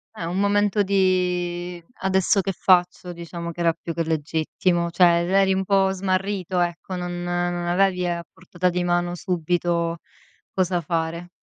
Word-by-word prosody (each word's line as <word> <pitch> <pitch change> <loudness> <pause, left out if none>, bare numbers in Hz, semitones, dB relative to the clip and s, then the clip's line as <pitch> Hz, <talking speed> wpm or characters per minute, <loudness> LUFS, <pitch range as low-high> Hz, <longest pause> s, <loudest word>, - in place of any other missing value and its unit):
È 175 - -6
un 175 +3 -2
momento 205 0 +2
di: 180 -2 0 0.2
"Adesso 190 +1 +2
che 195 - -2
faccio?" 180 0 +2
Diciamo 170 0 -6
che 175 - -12
era 170 -1 +3
più 165 0 -6
che 165 - -1
legittimo, 160 +2 -1
cioè 175 +2 +2 0.2
er - - -4
eri 195 0 +4
un 190 0 0
po' 195 -1 +3
smarrito, 190 -1 -1
ecco, 175 +2 -2
non 175 0 -4
non 175 0 -1
avevi 180 0 +2
a 170 -1 -2
portata 180 0 -2
di 180 0 -1
mano 175 0 0
subito 170 -1 -1 0.6
cosa 180 -1 0
fare. 165 +2 -3
175 Hz, 160 wpm, -23 LUFS, 170-190 Hz, 0.6 s, eri